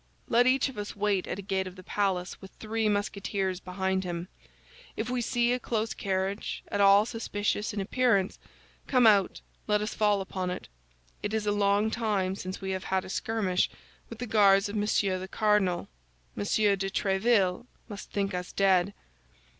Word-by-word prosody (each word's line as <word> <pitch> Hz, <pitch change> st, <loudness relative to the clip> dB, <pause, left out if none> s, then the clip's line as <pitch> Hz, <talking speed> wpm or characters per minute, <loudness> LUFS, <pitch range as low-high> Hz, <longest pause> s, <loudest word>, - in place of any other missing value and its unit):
Let 240 Hz, +1 st, +4 dB
each 265 Hz, +2 st, +3 dB
of 265 Hz, -6 st, -7 dB
us 205 Hz, -, -5 dB
wait 200 Hz, -2 st, 0 dB
at -, -, -3 dB
a 200 Hz, -, -7 dB
gate 190 Hz, -1 st, -1 dB
of 185 Hz, -, -9 dB
the 185 Hz, -, -12 dB
palace 185 Hz, -2 st, -1 dB
with 190 Hz, -, -10 dB
three 220 Hz, 0 st, -1 dB
Musketeers 200 Hz, -2 st, -1 dB
behind 190 Hz, +1 st, -2 dB
him; 175 Hz, 0 st, -5 dB, 0.7 s
if 225 Hz, +3 st, -2 dB
we 250 Hz, -1 st, 0 dB
see 240 Hz, +1 st, +1 dB
a 250 Hz, -, -1 dB
close 225 Hz, -2 st, -2 dB
carriage, 195 Hz, +1 st, -2 dB
at 205 Hz, -, 0 dB
all 200 Hz, +1 st, +6 dB
suspicious 215 Hz, -2 st, -2 dB
in 210 Hz, -, -4 dB
appearance, 200 Hz, -1 st, +1 dB, 0.5 s
come 255 Hz, -3 st, +4 dB
out, 200 Hz, -4 st, +4 dB, 0.3 s
let 210 Hz, 0 st, +3 dB
us 210 Hz, +1 st, -3 dB
fall 210 Hz, -2 st, +2 dB
upon 185 Hz, -1 st, -3 dB
it. 180 Hz, -, -5 dB, 0.5 s
It 210 Hz, -, -2 dB
is 215 Hz, -1 st, -1 dB
a 205 Hz, -, +2 dB
long 205 Hz, +1 st, +2 dB
time 205 Hz, -5 st, 0 dB
since 185 Hz, -1 st, -6 dB
we 190 Hz, 0 st, -3 dB
have 190 Hz, 0 st, -3 dB
had 190 Hz, -1 st, 0 dB
a -, -, -9 dB
skirmish 200 Hz, -3 st, 0 dB, 0.4 s
with 230 Hz, -, -8 dB
the 245 Hz, -, -4 dB
Guards 200 Hz, -3 st, +4 dB
of 205 Hz, -, -6 dB
Monsieur 205 Hz, -2 st, +1 dB
the 185 Hz, -, -6 dB
Cardinal; 210 Hz, -4 st, +1 dB, 0.5 s
Monsieur 205 Hz, 0 st, +2 dB
de 195 Hz, 0 st, -3 dB
Tréville 195 Hz, +1 st, +1 dB, 0.2 s
must 205 Hz, -3 st, -8 dB
think 200 Hz, -1 st, -1 dB
us 180 Hz, 0 st, -4 dB
dead." 195 Hz, 0 st, +2 dB
200 Hz, 180 wpm, -28 LUFS, 190-215 Hz, 0.7 s, all